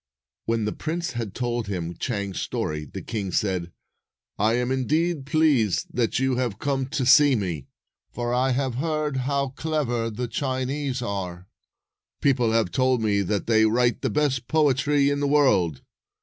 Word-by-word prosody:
When 115 -1 0
the 105 - -1
prince 170 0 -3
had 115 -5 -5
told 120 -2 -2
him 85 -3 -4
Chang's 100 -2 -3
story, 75 0 -3
the - - -8
king 100 -5 -4
said, 90 -3 -1 0.3
" - - -66 0.3
I 110 +2 +3
am, 125 +1 0
indeed, 150 +3 0
pleased 140 - +2
that 120 -2 +1
you 130 -1 +1
have 120 -6 -1
come 135 +1 -1
to 135 -1 -2
see 145 +1 +6
me, 85 - -3 0.4
for 120 0 -3
I 130 +2 +2
have 130 0 0
heard 155 -3 -1
how 140 +1 0
clever 130 -5 -1
the 120 +3 -4
Chinese 130 +1 -2
are. 95 -4 -4 0.7
People 125 -5 +2
have 110 -5 +1
told 130 -3 +2
me 100 -2 +2
that 100 +1 -1
they 110 -1 +4
write 120 +1 +1
the - - 0
best 135 -5 0
poetry 145 -1 +2
in 145 - -1
the 145 - 0
world. 130 - +2
125 Hz, 165 wpm, -25 LUFS, 105-140 Hz, 0.7 s, see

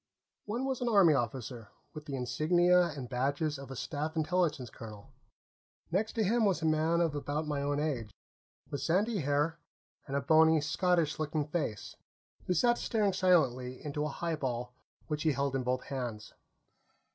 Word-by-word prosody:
One 235 +5 -2
was 265 -2 -2
an 245 - +1
Army 195 -8 +6
officer, 120 -3 -3 0.2
with 150 -1 -8
the 140 - -4
insignia 175 +7 +3
and 140 -6 -6
badges 140 +4 -1
of 140 - -9
a 135 - -6
Staff 150 +4 -3
Intelligence 155 -5 0
colonel. 105 -3 -11 0.8
Next 210 +5 0
to 225 - +1
him 225 +4 +2
was 190 -5 +1
a - - +1
man 160 +2 +2
of 165 -3 +1
about 145 +1 -2
my 145 -2 -2
own 145 0 0
age, 135 -8 -2 0.6
with 140 - -3
sandy 195 +8 +1
hair 145 +2 0 0.5
and 140 - -3
a 140 - +1
bony, 160 +2 +5
Scottish 160 +1 +1
looking 155 -1 -1
face, 150 - -3 0.5
who 180 - +1
sat 240 +3 +3
staring 210 -4 +1
silently 130 -10 +2
into 150 0 -2
a - - 0
highball 135 -7 -3 0.3
which 150 -1 -3
he 155 -1 +2
held 140 0 -1
in 135 - 0
both 125 0 -1
hands. 120 -6 -5
150 Hz, 170 wpm, -31 LUFS, 135-175 Hz, 0.8 s, Army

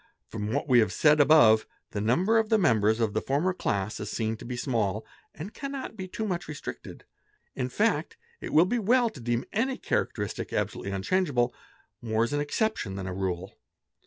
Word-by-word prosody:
From 105 -1 -4
what 140 +4 -1
we 125 -3 +6
have 110 - +2
said 150 0 +4
above, 135 -8 +6 0.2
the 100 - -3
number 180 - +3
of 220 -1 -1
the 220 - +4
members 110 - +3
of 110 -3 0
the - - 0
former 150 +8 0
class 100 - -2
is - - -5
seen 110 -1 -1
to - - -11
be 125 0 -5
small 110 -5 -1 0.3
and 180 +9 -7
cannot 275 -4 -6
be 190 -3 -6
too 220 +4 -4
much 175 -4 -3
restricted; 150 -1 -8 0.5
in 125 -1 -3
fact 215 - 0 0.2
it - - -6
will 160 +3 +6
be 240 +6 0
well 235 +2 +3
to 140 - -12
deem 120 0 -1
— - - -23
any 255 +5 0
characteristic - - -2
absolutely 100 - -2
unchangeable, 120 - 0 0.5
more 110 -1 0
as 120 - -2
an 145 - +1
exception 145 - -1
than 95 -1 -5
a 95 - -4
rule. 95 0 -3
130 Hz, 195 wpm, -27 LUFS, -, 0.5 s, we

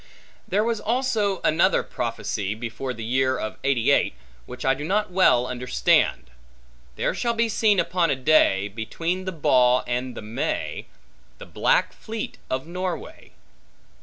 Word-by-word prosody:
There 205 +2 +1
was 230 -1 -1
also 225 -5 0
another 170 +5 +3
prophecy, 110 -3 -3
before 120 +3 -5
the 115 -2 -7
year 130 +3 +1
of 110 - -5
'88, 135 -4 +2 0.3
which - - -7
I 135 - +4
do 140 +2 -6
not 205 +5 0
well 180 -10 +4
understand. 125 - +1 0.6
There - - 0
shall 235 -1 -1
be 230 0 +2
seen 215 -3 +2
upon 175 -2 +1
a - - +2
day, 125 -8 +3
Between 165 - -3
the 185 - -2
Baugh 125 -6 +3
and 125 +1 -3
the - - -6
May, 140 - -3 0.5
The - - -10
black - - +1
fleet 220 -1 -6
of 130 +2 -2
Norway. 180 +1 -6
145 Hz, 145 wpm, -24 LUFS, 125-200 Hz, 0.6 s, I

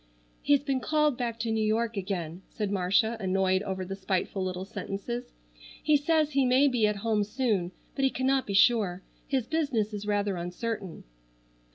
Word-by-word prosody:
"He's 285 -1 +3
been 275 -2 0
called 300 0 +2
back 235 -2 -3
to 230 -1 -1
New 220 0 +1
York 225 +2 0
again," 185 -3 -4
said 210 -2 -3
Marcia 200 +4 +2
annoyed 190 -1 +1
over 190 -2 -3
the 195 +1 -5
spiteful 190 0 -2
little 185 0 -3
sentences. 225 +5 -5 0.5
"He 305 - +4
says 305 +1 +2
he 275 -1 +3
may 260 +3 +4
be 240 -5 +2
at 210 - 0
home 215 -2 +2
soon, 210 -5 -1 0.2
but 275 - -2
he 270 - +5
cannot 265 +1 0
be 200 - -2
sure. 195 -4 +3 0.2
His 265 -5 0
business 245 -9 0
is 205 0 -5
rather 205 -2 0
uncertain." 185 +2 -4
215 Hz, 175 wpm, -28 LUFS, 195-255 Hz, 0.5 s, he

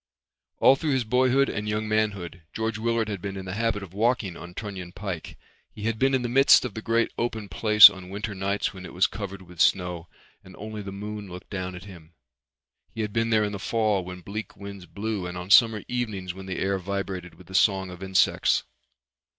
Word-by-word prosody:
All 135 - +6
through 150 +1 -1
his 130 -2 +1
boyhood 130 +4 +3
and 105 +1 -3
young 105 +1 -1
manhood 100 -5 -1
George 110 -1 -2
Willard 115 -1 0
had 100 -4 -4
been 100 0 -5
in 95 - -6
the 90 - -5
habit 110 -1 -1
of 95 -2 -11
walking 110 -3 0
on 85 +1 -10
Trunion 95 -5 -6
Pike. 90 -4 -6 0.4
He 105 - -8
had 110 0 -1
been 135 0 +3
in 130 - 0
the - - -1
midst 135 +2 +6
of 120 - -5
the 110 - -6
great 115 +1 +1
open 110 -3 -2
place 105 +4 +9
on 90 -1 -6
winter 105 +2 -4
nights 100 +1 -1
when 95 -1 -10
it 90 - -10
was 90 - +4
covered 100 -1 -5
with 90 -2 -15
snow 90 -2 +2 0.4
and 95 - -14
only 110 +1 -7
the 100 -1 -7
moon 105 0 -6
looked 90 0 -10
down 95 -2 -4
at 90 - -9
him; 85 -4 -14 0.8
he 115 - -2
had 105 -1 -3
been 115 0 +1
there 110 -1 +3
in 105 - -1
the 100 - -5
fall 110 -3 0
when 90 0 -8
bleak 100 +2 -7
winds 100 -2 -9
blew 105 -3 -4
and 90 0 -6
on 90 +2 -6
summer 110 -2 +6
evenings 105 -7 -3
when 95 +1 -10
the 95 - -4
air 95 0 0
vibrated 95 -2 -4
with 90 +2 -16
the 95 - -13
song 95 -1 +2
of 90 0 -11
insects. 95 -1 +2
100 Hz, 220 wpm, -26 LUFS, 95-110 Hz, 0.8 s, place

